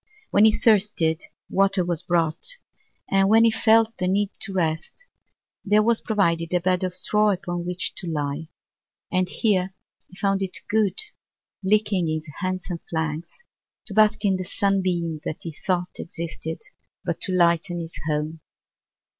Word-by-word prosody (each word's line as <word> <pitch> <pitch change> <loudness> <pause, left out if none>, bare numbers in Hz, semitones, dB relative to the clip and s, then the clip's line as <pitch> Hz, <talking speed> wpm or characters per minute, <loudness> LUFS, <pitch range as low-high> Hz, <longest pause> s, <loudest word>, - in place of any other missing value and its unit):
When 205 - +6
he 220 - +4
thirsted 200 -7 +2 0.3
water 195 -2 +2
was 170 -2 0
brought, 170 - -1 0.5
and 195 0 +4
when 225 +1 +6
he 230 - +5
felt 225 0 +4
the 180 - 0
need 200 +2 +1
to 200 - -4
rest, 175 - -2 0.6
there 210 +1 +4
was 230 0 +2
provided 170 -5 +1
a - - +4
bed 180 +1 +1
of 180 -1 -2
straw 210 +3 +3
upon 175 -3 -2
which 180 0 -2
to 180 - -5
lie; 150 0 -2 0.6
and 185 -1 +1
here 190 -3 0 0.3
he 185 - -17
found 195 -1 +1
it 190 -1 -2
good, 215 -2 +1 0.7
licking 200 -3 +2
his 155 0 -2
handsome 185 -2 -3
flanks, 160 - -3 0.4
to 205 - -8
bask 215 +1 +4
in 195 -2 +3
the 185 - -3
sun 195 +1 +1
beam 170 -4 -1
that 155 - -5
he 165 - -5
thought 180 +2 -2
existed 165 -1 -6 0.4
but 170 - -2
to 190 - -1
lighten 175 -1 +2
his 165 -1 -6
home. 155 +1 -1
185 Hz, 155 wpm, -24 LUFS, 170-205 Hz, 0.7 s, When